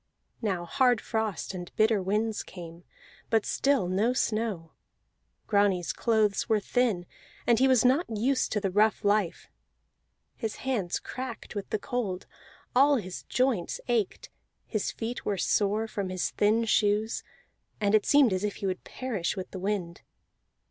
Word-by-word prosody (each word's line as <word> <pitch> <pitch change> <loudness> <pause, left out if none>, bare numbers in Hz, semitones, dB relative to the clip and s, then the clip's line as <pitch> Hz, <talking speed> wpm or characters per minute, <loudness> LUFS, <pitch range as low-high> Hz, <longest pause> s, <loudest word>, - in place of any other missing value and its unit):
Now 190 -6 -1
hard 250 +3 +3
frost 220 -4 -2
and 180 -1 -7
bitter 215 -2 +3
winds 210 +3 0
came, 170 -2 -10 0.5
but 225 -2 +2
still 275 -9 +1
no 205 +7 +1
snow. 215 -9 -1 0.7
Grani's 195 -6 +2
clothes 220 -2 +1
were 220 -1 +4
thin, 210 -4 0 0.4
and 235 -1 +4
he 265 - +5
was 255 -2 +4
not 270 +7 +3
used 240 +5 0
to 210 - +1
the 195 -2 -1
rough 210 +2 +2
life; 205 -3 +1 0.9
his 225 -3 -4
hands 210 -10 0
cracked 255 -3 -7
with 205 -2 -5
the - - 0
cold, 205 -4 -3 0.5
all 280 +3 +6
his 185 -7 -5
joints 250 -9 0
ached, 240 - -1 0.3
his 215 -3 -2
feet 235 +2 -5
were 200 - -1
sore 210 +4 +1
from 200 -3 -3
his 185 -1 -1
thin 220 +3 +2
shoes, 215 0 +1 0.6
and 205 -1 +1
it 215 -1 +4
seemed 280 -7 +5
as 185 +1 -1
if 210 -1 -1
he - - -5
would 185 -1 -2
perish 215 -8 -3
with 185 - -5
the 190 - -6
wind. 185 -3 -3
215 Hz, 155 wpm, -28 LUFS, 190-235 Hz, 0.9 s, all